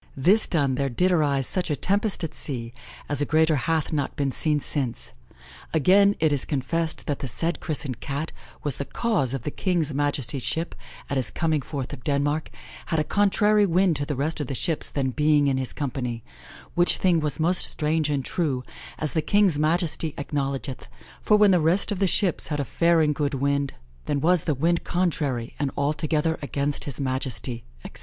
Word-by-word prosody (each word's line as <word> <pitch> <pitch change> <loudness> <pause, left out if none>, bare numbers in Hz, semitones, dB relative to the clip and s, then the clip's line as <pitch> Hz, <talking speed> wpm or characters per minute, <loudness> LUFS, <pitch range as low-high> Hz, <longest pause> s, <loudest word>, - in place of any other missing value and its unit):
This 190 +11 +4
done, 140 -6 +1
there 135 +1 0
did 180 +10 +1
arise 145 -6 +2
such 180 +5 -1
a 150 - +1
tempest 200 +3 0
at 165 - -3
sea, 120 -5 0 0.3
as 145 0 -1
a - - +3
greater 160 +2 +3
hath 160 +4 -1
not 145 -3 -1
been 140 -2 0
seen 150 +1 +1
since. 135 -4 -3 0.6
Againe 200 +6 +5
it 155 -2 +3
is 140 - +1
confessed 160 +3 -2
that 145 -3 -2
the 135 - -4
said 165 +8 -2
christened 140 -6 -3
Cat 145 +3 -4 0.3
was 145 -4 0
the 140 - -3
cause 140 - 0
of 130 - -6
the 150 - -3
Kinge's 170 -5 -1
majestie's 140 -2 -1
shippe, 165 +1 -2 0.3
at 140 - -2
his 130 -4 0
coming 160 -3 0
forthe 135 -1 -5
of 125 - -9
Denmark, 145 +2 0 0.4
had 160 - 0
a - - +2
contrarie 205 +3 +3
winde 180 0 +3
to 145 - -2
the 145 - -2
rest 150 +5 -2
of 145 - -3
the 135 - -3
shippes 165 +3 -1
then 135 -2 -1
being 150 +1 +3
in 135 -1 +1
his 130 -1 -2
companie, 125 -5 -4 0.5
which 175 0 +4
thing 180 -3 +3
was 150 -2 -1
most 175 +3 +2
straunge 155 0 +1
and 135 -3 -1
true, 140 -8 -1 0.3
as 155 - -2
the 160 - +1
Kinge's 195 -3 +3
Majestie 160 0 +1
acknowledgeth, 135 - -3 0.3
for 210 - +4
when 210 -1 +6
the 180 -3 +4
rest 175 +7 +2
of 200 - -2
the 195 - +3
shippes 185 -1 +1
had 150 -1 -2
a 140 - -1
fair 170 +5 +3
and 150 -1 +2
good 145 -1 -1
winde, 140 +1 0 0.3
then 145 - 0
was 170 +2 +3
the 150 - +1
winde 165 +5 +1
contrarie, 145 -9 -1
and 145 -2 0
altogether 155 +2 0
against 140 +1 -1
his 140 -2 -5
Majestie," 130 -3 -3 0.2
etc. - - -6
150 Hz, 195 wpm, -25 LUFS, 140-165 Hz, 0.6 s, when